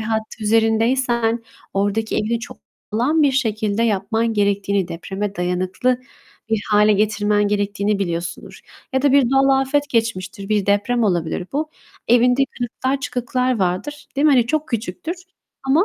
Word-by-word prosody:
hattı 220 0 -3
üzerindeysen 225 +1 +2 0.3
oradaki 205 +3 0
evini 230 +2 0
çok - - -9 0.4
sağlam 285 +8 +2
bir 280 -2 +4
şekilde 220 -4 0
yapman 220 +2 0
gerektiğini, 200 -2 +1
depreme 195 +4 -4
dayanıklı 185 +8 0 0.5
bir 220 -2 +1
hâle 210 0 +5
getirmen 205 0 +1
gerektiğini 205 0 0
biliyorsundur. 170 -2 -4 0.3
Ya 265 - +1
da 285 -2 +3
bir 275 -4 +4
doğal 270 0 +4
afet 290 +2 0
geçmiştir, 210 -5 -2
bir 210 -2 +1
deprem 205 +4 +2
olabilir 175 -2 -1
bu. 305 +2 -2 0.4
Evinde 245 +3 +4
kırıklar, 260 +3 -2
çıkıklar 250 -1 -1
vardır, 195 +11 -2
değil 290 +3 +3
mi? 295 - +6
Hani 245 -3 +4
çok 310 +1 -1
küçüktür 235 - -3 0.5
ama, 305 +8 +4
225 Hz, 140 wpm, -20 LUFS, 200-255 Hz, 0.5 s, mi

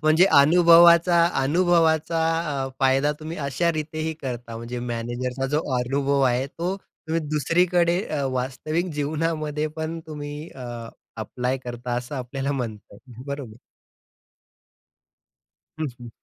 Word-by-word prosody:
म्हणजे 155 +4 +5 0.2
अनुभवाचा 170 +2 +6 0.2
अनुभवाचा 165 +1 +2 0.5
अ, - - -4
फायदा 135 +2 +3
तुम्ही 160 +2 -6
अशा 170 +5 +1
रीतेही 155 0 -3
करता 120 -3 -5
म्हणजे 120 +1 -6
मॅनेजरचा 120 +2 -3
जो 150 +3 0 0.2
अनुभव 140 +3 0
आहे, 130 0 +2
तो 175 +6 -3 0.3
तुम्ही 165 +1 0
दुसरीकडे 170 +4 +2
अ, 150 -7 -3
वास्तविक 145 +7 -2
जीवनामध्ये 155 0 -1
पण 160 +1 -3
तुम्ही 145 -1 -6 0.8
ॲप्लाय 125 +4 -2
करता 120 0 -4
असं 125 +3 -4
आपल्याला 135 +2 -3
म्हणता 115 -7 -5
येईल. 120 +3 -13
बरोबर. 140 -6 -6 2.2
हं, 155 - -1
हं, 120 - -8
145 Hz, 115 wpm, -24 LUFS, 125-165 Hz, 2.2 s, अनुभवाचा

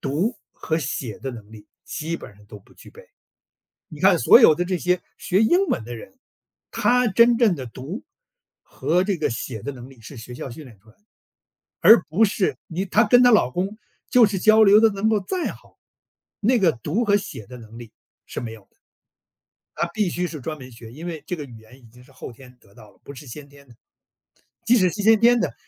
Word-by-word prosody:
读 175 - -2 0.2
和 160 - -3
写 125 -7 -5
的 135 +2 -6
能 110 -3 -12
力 110 -2 -14 0.2
基 165 +2 -5
本 - - -12
上 105 - -20
都 105 0 -12
不 - - -24
具 - - -16
备。 480 - -15 0.9
你 150 - -10
看 190 0 +4
所 235 - +6
有 160 -11 +6
的 175 - -1
这 180 0 -2
些 180 +1 0 0.2
学 190 +3 0
英 350 - +3
文 110 - -2
的 120 0 -8
人， 260 - -14 0.5
他 250 0 +2
真 235 +4 +4
正 220 -8 +3
的 130 - -7
读 135 - -8 0.6
和 180 +3 -1
这 195 -1 -2
个 - - -1
写 115 -1 -6
的 140 - -6
能 125 0 -12
力 135 -3 -18
是 115 +6 -12
学 120 +1 -10
校 130 - -7
训 150 +6 -10
练 115 -7 -16
出 110 - -31
来 110 - -23
的。 - - -41 0.8
而 225 - +7
不 170 +10 +1
是 200 -2 -1
你 180 +4 -3
她 210 +4 +3
跟 245 +3 +5
她 245 - +6
老 210 -12 +3
公 190 +9 -3 0.3
就 245 -2 +5
是 200 -2 -3
交 220 +3 +5
流 210 +1 +6
得 225 - +5
能 200 +2 -1
够 215 -1 +2
再 345 - -3
好， - - -16 0.6
那 235 +2 +1
个 175 -4 +4
读 155 - -3
和 205 -2 +3
写 155 - -7
的 125 - -10
能 115 0 -14
力 120 -2 -12 0.3
是 - - -8
没 115 -2 -7
有 115 - -12
的。 - - -40 1.0
它 170 - -1
必 210 -4 0
须 180 +1 -3
是 155 -4 -8
专 155 +4 -6
门 130 -2 -12
学， 115 -1 -13
因 155 +7 -10
为 165 -3 -6
这 180 - -3
个 150 - -7
语 120 -4 -13
言 110 +4 -18
已 125 - -25
经 125 +1 -18
是 - - -22
后 - - -10
天 125 +1 -17
得 100 - -24
到 110 -3 -16
了， - - -30
不 140 - -11
是 140 +1 -12
先 140 +4 -10
天 140 0 -19
的。 120 - -19 0.9
即 235 +2 +4
使 185 -4 +3
是 205 - -5
先 220 0 +5
天 240 +1 +4
的， - - -2
160 Hz, 250 characters per minute, -22 LUFS, 125-210 Hz, 1.0 s, 而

